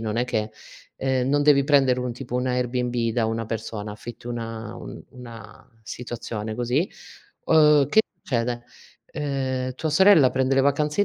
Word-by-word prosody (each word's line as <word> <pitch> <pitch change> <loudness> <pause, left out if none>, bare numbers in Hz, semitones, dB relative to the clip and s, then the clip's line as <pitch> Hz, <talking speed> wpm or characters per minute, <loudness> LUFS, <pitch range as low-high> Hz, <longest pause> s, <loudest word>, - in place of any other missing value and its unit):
non 110 -1 -3
è 120 - +1
che 110 -3 -2 0.5
ehm, 130 -1 0
non 145 +1 +2
devi 145 -2 +5
prendere 135 -3 +3
un 125 -1 -3
tipo 125 0 -8
un 125 +1 -1
Airbnb 125 -2 -1
da 115 -1 +1
una 115 0 -2
persona, 110 -2 -5
affitti 120 +3 -10
una 115 -2 -5
un - - -9
una 120 -3 -12 0.2
situazione 110 -2 -6
così, 125 - 0 0.5
uhm, 150 -3 +5
che 220 - +5 0.2
succede, 120 -6 -2 0.4
ehm, 130 -3 -3
tua 155 +3 -3
sorella 160 -4 +6
prende 130 0 +1
le 135 - +4
vacanze 150 +5 +1
i - - +1
125 Hz, 165 wpm, -24 LUFS, 115-140 Hz, 0.5 s, sorella